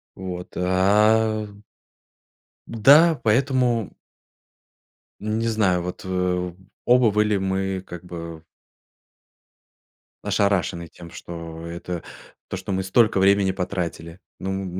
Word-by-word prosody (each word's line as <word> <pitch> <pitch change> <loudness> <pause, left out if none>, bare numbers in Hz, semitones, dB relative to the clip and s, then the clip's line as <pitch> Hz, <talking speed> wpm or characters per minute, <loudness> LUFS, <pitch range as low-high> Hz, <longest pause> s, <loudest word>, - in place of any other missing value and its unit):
Вот. 90 -1 -6
А. 105 +4 +3 1.2
Да, 145 +8 +5
поэтому. 120 -1 +1 1.3
Не 110 +2 -2
знаю, 100 -6 +1
вот, 90 +1 -6
э, 90 -1 -1 0.3
оба 125 -2 +5
были 105 0 +2
мы, 95 0 -2
как 90 0 -9
бы 85 -2 -8 1.8
ошарашены 95 -4 0
тем, 85 0 -13
что, 85 -1 -8
это, 85 0 -6 0.5
то - - -4
что - - -7
мы 95 0 -1
столько 105 +1 +3
времени 100 0 +4
потратили. 90 -2 -4 0.2
Ну, 95 - -4
м 95 0 -3
95 Hz, 100 wpm, -23 LUFS, 90-110 Hz, 1.8 s, Да